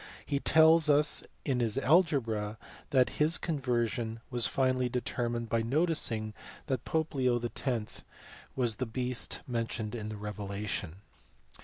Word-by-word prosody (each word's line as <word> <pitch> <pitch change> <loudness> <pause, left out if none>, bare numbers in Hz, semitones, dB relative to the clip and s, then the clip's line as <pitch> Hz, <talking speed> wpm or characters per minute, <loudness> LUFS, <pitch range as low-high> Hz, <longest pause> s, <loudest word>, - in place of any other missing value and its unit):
He 140 -2 0
tells 160 +1 +5
us 150 +1 +4 0.2
in 130 -4 +1
his 115 -3 0
algebra 120 - +2 0.3
that 130 -2 +4
his 155 +3 +4
conversion 120 -6 -1
was 120 -2 +1
finally 130 -1 +1
deter 120 -1 -2
mined 120 0 -3
by 115 0 +1
noticing 120 -5 0 0.3
that 130 -4 -2
the - - -11
pope 160 0 0
Leo 125 -3 +2
X. 120 -1 -3 0.5
was 120 -5 0
the 130 - -2
beast 125 +1 -2
men 115 -2 -1
tioned 110 -2 -4
in 110 -3 -4
the 110 - -6
Revelation. 100 -3 -5
120 Hz, 145 wpm, -31 LUFS, 110-140 Hz, 0.5 s, tells